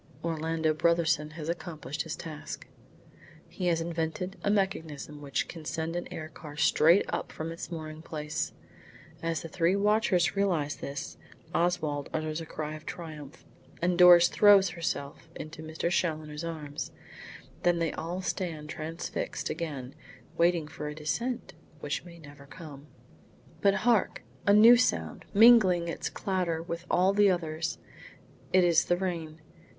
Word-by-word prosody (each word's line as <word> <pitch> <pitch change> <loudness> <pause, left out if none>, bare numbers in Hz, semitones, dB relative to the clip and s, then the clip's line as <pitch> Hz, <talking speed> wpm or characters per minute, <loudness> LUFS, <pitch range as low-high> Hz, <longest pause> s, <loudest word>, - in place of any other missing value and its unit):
Orlando 160 -1 0
Brotherson 160 -1 +1
has 155 -1 -7
accomplished 160 -5 -4
his 165 -2 -4
task. 155 -3 -7 0.8
He 180 - -4
has 165 -1 +2
invented 165 +3 -3
a - - +1
mechanism 160 -7 -2
which 140 -2 -2
can 165 -2 -9
send 160 +2 -3
an 175 - -4
air 155 - -5
car 150 -1 -11
straight 165 +5 +5
up - - -3
from 160 +1 -5
its 165 - -7
mooring 155 -1 -6
place. 155 0 -3 0.7
As 165 -1 -2
the - - -5
three 170 +2 +1
watchers 205 -3 +2
realise 175 -8 +1
this, 140 0 -6 0.4
Oswald 160 -5 0
utters 155 0 -2
a 160 - -8
cry 155 0 -5
of 155 0 -9
triumph, 155 -4 -8 0.3
and 175 +1 +1
Doris 175 -1 +8
throws 200 -2 +6
herself 160 -2 -4
into 155 +1 -8
Mr. 160 +2 -3
Challoner's 155 -3 -1
arms. 155 -3 -5 0.7
Then 175 -1 +3
they 165 -2 0
all 175 +3 -4
stand 160 -5 -3
transfixed 165 +1 -4
again, 145 -6 -5 0.4
waiting 170 -2 +2
for 150 0 -6
a 150 - -5
descent 235 +11 -3 0.3
which 145 0 -3
may 170 -1 -12
never 145 -3 -14
come. 145 -2 -11 0.7
But 200 -1 +4
hark! 230 - +2 0.2
a - - +7
new 225 +4 +9
sound, 245 - 0
mingling 200 -6 +7
its 170 - -3
clatter 180 -5 -2
with 170 +1 -6
all 185 +2 +3
the 205 0 +5
others. 165 -2 -2 0.7
It 185 0 +5
is 170 -2 +4
the 175 - +2
rain. 165 -4 -4
165 Hz, 145 wpm, -29 LUFS, 155-180 Hz, 0.8 s, new